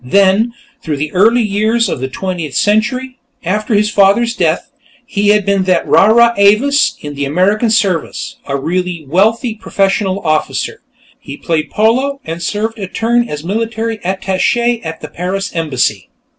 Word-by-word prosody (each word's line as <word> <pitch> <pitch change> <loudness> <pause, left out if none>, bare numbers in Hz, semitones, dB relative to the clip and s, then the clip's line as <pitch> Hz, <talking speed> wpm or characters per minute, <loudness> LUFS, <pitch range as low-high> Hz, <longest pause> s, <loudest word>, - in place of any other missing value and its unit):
Then, 200 - +2 0.3
through 150 -3 -3
the 150 +2 -3
early 225 +6 +3
years 215 +3 +1
of 160 - -3
the 130 - -2
Twentieth 170 0 -5
Century, 250 +5 0 0.2
after 210 +5 -1
his 210 +1 +2
father's 210 +4 +3
death, - - -1 0.3
he 205 0 -1
had 210 -1 +3
been 200 -2 +1
that 185 -2 +1
rara 235 +3 +5
avis 220 +9 +3
in 145 0 -6
the 140 0 -4
American 195 - +1
service, 200 -7 -1
a 140 0 -1
really 175 +2 -3
wealthy 220 - +1
professional 195 -2 -1
officer. 155 0 -1 0.4
He 140 - -9
had - - -21
played 155 -2 0
polo, 260 +6 +1
and 165 +1 -5
served 220 +5 -2
a 195 - -4
turn 235 +4 0
as 150 0 -5
military 225 +3 -3
attache 195 +6 0
at 160 -1 -6
the 155 - -6
Paris 180 +5 -4
embassy. 130 - -1
200 Hz, 155 wpm, -14 LUFS, 170-225 Hz, 0.4 s, rara